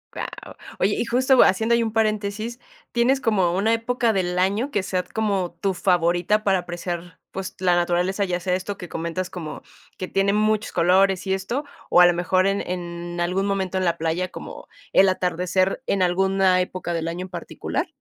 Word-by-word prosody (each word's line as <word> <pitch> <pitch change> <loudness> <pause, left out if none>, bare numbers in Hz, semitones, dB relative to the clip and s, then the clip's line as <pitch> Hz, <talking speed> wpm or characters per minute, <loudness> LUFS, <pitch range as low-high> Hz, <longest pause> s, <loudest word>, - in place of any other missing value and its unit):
Wao. - - -7 0.2
Oye 200 +2 +2
y - - -1
justo 255 +2 +4
haciendo 220 +5 +2
ahí 235 - +2
un 220 -1 -3
paréntesis, 215 +1 -1 0.3
¿tienes 255 +3 +2
como 190 -8 +2
una 215 +4 +2
época 230 0 +1
del 180 -2 -1
año 200 +8 +1
que 205 - 0
sea 185 -1 -1
como 195 -3 -2
tu 195 -1 +1
favorita 180 +3 +1
para 195 -2 +2
apreciar, 175 0 -6
pues, 190 -1 -6
la 180 -1 +3
naturaleza?, 175 +3 +1
ya 180 -2 -1
sea 180 +1 -1
esto 195 +2 -4
que 175 - -9
comentas 170 +3 -3
como 165 -4 -7 0.4
que 185 - -4
tiene 195 +1 +1
muchos 215 0 +1
colores 185 +2 +3
y 190 - +1
esto, 200 +9 -2 0.3
¿o 175 - +6
a - - +9
lo 175 - +5
mejor 185 +2 +1
en 195 0 0
en 175 -1 -5
algún 180 +3 0
momento 190 -2 -1
en 185 - 0
la 170 -1 +1
playa, 165 +3 -1
como - - -9 0.3
el 195 0 +6
atardecer 185 +2 0
en 195 - +1
alguna 190 0 +3
época 180 -1 -4
del 165 -1 -2
año 175 +2 -4
en - - -12
particular? 175 -1 -4
185 Hz, 190 wpm, -23 LUFS, 175-205 Hz, 0.4 s, a